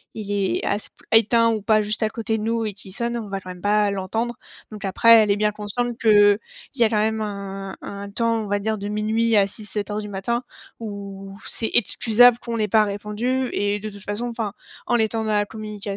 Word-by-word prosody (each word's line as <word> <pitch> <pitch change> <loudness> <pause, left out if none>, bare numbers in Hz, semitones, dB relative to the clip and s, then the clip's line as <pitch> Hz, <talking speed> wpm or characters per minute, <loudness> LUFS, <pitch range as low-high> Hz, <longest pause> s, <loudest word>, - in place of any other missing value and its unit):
il 205 -2 -5
est 200 -2 0
ass 205 +1 -2
p - - -57 0.2
éteint 230 +1 +3
ou 220 -2 -2
pas, 215 +1 +3
juste 210 +2 -2
à 220 - +2
côté 225 -1 -2
de 210 - -4
nous, 230 0 0
et 210 - -3
qu'il 190 -1 -9
sonne, 235 +4 -2
on 220 -4 -5
va 195 - -3
quand 185 -1 -11
même 180 -1 -11
pas 205 0 +2
l'entendre, 220 +5 -2 0.4
donc 210 -2 -7
après, 210 +4 +2
elle 210 - +1
est 200 - +4
bien 210 0 +1
consciente 215 +4 -3
qu'il 205 -2 +5 0.4
y 235 - +4
a 220 - +4
quand 215 - 0
même 220 +1 +1
un 195 -2 -5
un 200 0 -7
temps, 230 +2 0
on 210 - -5
va 205 +1 +1
dire, 215 +1 -2
de 200 - -4
minuit 220 +2 +1
à 200 - +5
06:00-07:00 210 0 -4
du 210 - -7
matin, 235 +5 -2 0.4
où 200 -2 -8
c'est 225 - -2
excusable 240 +1 +5
qu'on 235 -2 -4
n'ait 215 -1 +1
pas 215 +2 +4
répondu, 210 +6 -2
et 205 0 0
de 215 0 -6
toute 200 - -12
façon, 210 +4 -2
enfin, 225 -4 -4 0.3
en 240 - +2
étant 220 0 0
dans 215 - -1
la 205 0 +2
communication, 210 -1 -8
210 Hz, 230 wpm, -22 LUFS, 200-225 Hz, 0.4 s, qu'il